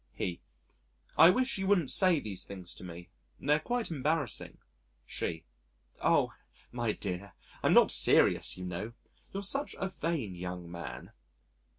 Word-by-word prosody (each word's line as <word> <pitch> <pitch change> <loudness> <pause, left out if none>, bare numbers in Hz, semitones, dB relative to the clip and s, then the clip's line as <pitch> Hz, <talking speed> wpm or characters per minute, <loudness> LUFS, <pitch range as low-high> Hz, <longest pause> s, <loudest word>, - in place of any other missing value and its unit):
He: 85 -1 -3 0.7
"I 165 - +9
wish 255 +3 +2
you 190 - -1
wouldn't 180 -9 +3
say 185 -5 +5
these 100 -7 -3
things 95 -3 -4
to - - -11
me 85 -1 -9 0.3
they're 150 +2 +2
quite 240 -1 -2
embarrassing." 150 -2 -1 0.5
She: 80 +5 -4 0.6
"Oh! - - +3 0.4
my 120 -2 -1
dear, 100 -1 -5 0.3
I'm - - +3
not - - +7
serious, - - +4
you 90 - -6
know 90 +6 -5 0.4
you're 195 +1 -4
such 275 +9 0
a 190 - -2
vain 160 - -3
young 90 -1 -6
man." 85 0 -7
120 Hz, 145 wpm, -31 LUFS, -, 0.7 s, I